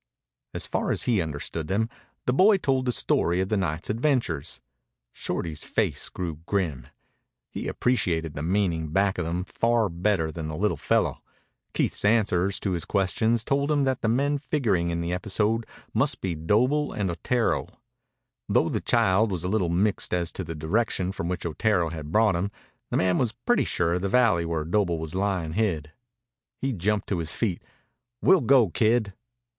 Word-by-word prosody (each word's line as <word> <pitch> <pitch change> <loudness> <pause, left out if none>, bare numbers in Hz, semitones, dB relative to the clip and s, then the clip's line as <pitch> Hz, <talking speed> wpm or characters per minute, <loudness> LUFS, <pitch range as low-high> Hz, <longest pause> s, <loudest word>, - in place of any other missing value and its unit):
As - - -1
far - - -2
as - - 0
he 115 -6 +2
understood 80 0 -4
them, 105 +4 +1 0.4
the 125 - +2
boy 195 +8 +6
told 130 -7 0
the - - +3
story 90 -6 +1
of 95 0 0
the 110 - +1
night's 85 -4 -2
adventures. 115 - -1 0.5
Shorty's 80 -3 -4
face - - -1
grew 85 -4 -4
grim. 80 -11 -1 0.6
He - - -5
appreciated 85 -11 0
the 70 - -5
meaning 85 -2 0
back 95 +4 +1
of - - -1
them 85 +2 -2
far 115 +1 +1
better 85 -2 0
than 80 0 -5
the 80 - -4
little 100 -3 +1
fellow. 70 - 0 0.5
Keith's - - 0
answers 100 -3 +2
to 100 - -1
his 85 -3 -2
questions 110 +5 +1
told 140 +3 0
him 145 -2 +2
that 130 -1 0
the - - 0
men 140 +5 +1
figuring 110 - 0
in 85 0 -1
the 85 +1 -2
episode 105 +4 0 0.3
must - - +1
be 95 -3 -2
Doble 120 - +1
and 100 -4 -1
Otero. 115 +8 0 0.8
Though - - +3
the - - -1
child 100 +3 +3
was 90 -3 -2
a - - -1
little 95 -4 +1
mixed 95 +2 +1
as 85 -2 -1
to - - -5
the 80 - -6
direction 90 +3 0
from 85 -3 -4
which 90 -2 -3
Otero 85 +1 +1
had 80 -2 -7
brought 105 -1 +4
him, 90 +4 -1 0.4
the - - 0
man 90 0 +2
was 120 -4 +1
pretty 240 - +1
sure 85 -1 0
of 90 - -1
the 100 - -1
valley 105 -7 +3
where 80 -2 -2
Doble 85 -1 +1
was 80 -1 -5
lying 95 -4 -1
hid. 85 -7 -1 0.7
He 135 0 -1
jumped 105 +1 -1
to 95 - 0
his 80 -1 -3
feet. 100 -7 -1 0.6
"We'll 190 -3 +6
go, 125 -4 +5
kid." 110 0 +2
95 Hz, 180 wpm, -26 LUFS, 85-115 Hz, 0.8 s, boy